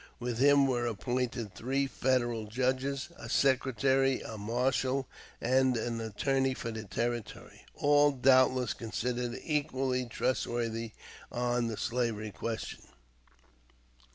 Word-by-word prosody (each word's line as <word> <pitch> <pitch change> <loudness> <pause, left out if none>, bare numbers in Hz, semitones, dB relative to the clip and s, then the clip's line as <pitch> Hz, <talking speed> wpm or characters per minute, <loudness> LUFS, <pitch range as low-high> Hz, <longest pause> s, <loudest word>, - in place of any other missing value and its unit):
With 120 -1 -3
him 140 +1 +6
were 120 -2 0
appointed 120 0 -2
three 135 +4 0
Federal 120 -5 0
judges, 130 +5 -1
a - - -9
secretary, 135 0 +2
a 115 - -7
marshal, 130 +5 0 0.3
and 130 0 +3
an 115 0 -2
attorney 130 +5 0
for 115 - -4
the 110 -1 -6
Territory, 115 +4 -4
all 145 0 +4
doubtless 130 -2 +4
considered 120 +1 -3
equally 130 -4 0
trustworthy 115 -2 -2 0.4
on 120 0 0
the 110 -2 -4
slavery 115 -3 -1
question. 115 +2 -5
125 Hz, 110 wpm, -31 LUFS, 115-130 Hz, 0.4 s, him